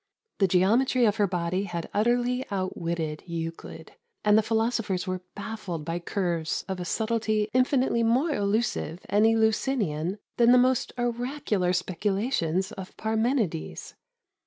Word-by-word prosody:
The 195 - +4
geometry 230 +8 +3
of 210 0 +2
her 205 -2 +3
body 180 +1 -1
had 170 -4 -4
utterly 245 +3 +1
outwitted 170 -5 -3
Euclid, 165 -1 -6 0.3
and 210 0 +6
the 220 - +6
Philosophers 225 -4 0
were 185 -1 -3
baffled 200 -7 -5
by 165 +2 -2
curves 170 -3 -2
of 190 -1 -4
a 180 - -4
subtlety 220 0 0
infinitely 255 -1 +2
more 250 +8 +2
elusive 200 - -1
aud 210 +2 +5
Eleusinian 220 - +1 0.2
than 235 0 +6
the - - +7
most 255 0 +2
oracular 240 -5 -1
speculations 190 0 -1
of 190 -1 -9
Parmenides. 220 - -1
210 Hz, 130 wpm, -27 LUFS, 180-235 Hz, 0.3 s, the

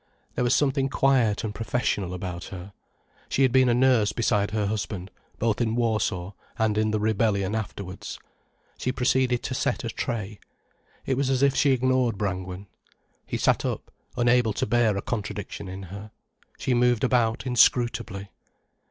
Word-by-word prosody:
There - - -1
was 120 +1 +3
something 135 -1 +1
quiet 125 -7 +2
and 110 -2 -3
professional 105 -5 -1
about 90 -1 -5
her. 95 +1 -9 0.6
She 135 - +2
had 130 - +4
been 130 0 +5
a - - +4
nurse 125 -4 +4
beside 105 -3 +1
her 105 -1 -1
husband, 100 -2 -3 0.3
both 115 0 0
in 115 -1 +1
Warsaw 105 -6 0 0.3
and 110 -1 +1
in 110 0 +2
the 110 0 0
rebellion 105 -2 +1
afterwards. 100 -4 -5 0.6
She 125 - 0
proceeded 125 -1 +1
to - - -3
set 130 - -1
a 115 - -2
tray. 110 -3 -4 0.7
It 130 - 0
was 135 -1 +1
as 135 0 +2
if 140 -1 +4
she 145 - +3
ignored 130 -3 +2
Brangwen. 95 -1 -3 0.6
He - - -2
sat - - +2
up, - - -4 0.3
unable 120 -2 +3
to - - -1
bear 115 -2 +2
a - - -3
contradiction 105 -4 -4
in 95 +1 -7
her. 105 +2 -8 0.5
She 130 - 0
moved 120 -1 +3
about 120 -2 +2
inscrutably. 120 -5 +2
110 Hz, 160 wpm, -26 LUFS, 100-125 Hz, 0.7 s, been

